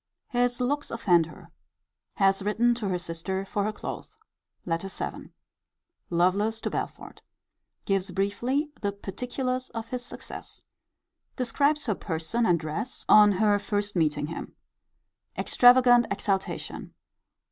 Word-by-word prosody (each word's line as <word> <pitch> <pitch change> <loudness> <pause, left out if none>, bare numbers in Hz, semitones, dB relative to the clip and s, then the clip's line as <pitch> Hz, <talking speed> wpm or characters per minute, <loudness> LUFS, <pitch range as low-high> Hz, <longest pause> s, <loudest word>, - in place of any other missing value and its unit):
His 245 0 +1
looks 285 +4 -1
offend 175 -8 +3
her. - - -13 0.7
Has 195 -1 +3
written 225 +4 +2
to 225 -4 -3
her 180 - 0
sister 175 +3 -4
for 200 +1 -1
her 215 - 0
clothes. 430 - -7 0.5
LETTER 170 +2 -2
VII. 195 - -6 0.8
Lovelace 195 +6 +2
to - - -2
Belford. - - -5 0.6
Gives 195 -1 0
briefly 235 - -1
the 200 -1 -1
particulars 250 +6 -3
of 225 0 -5
his 250 -1 -4
success. - - -8 0.7
Describes 285 +4 +1
her 220 - +1
person 185 +6 -2
and 175 -2 +3
dress 155 +11 -4
on 210 -1 +7
her 205 +1 +3
first 205 0 -2
meeting 150 -3 +1
him. 165 +2 -7 0.8
Extravagant 245 -1 +6
exultation. 195 -2 -3
205 Hz, 125 wpm, -27 LUFS, 185-245 Hz, 0.8 s, on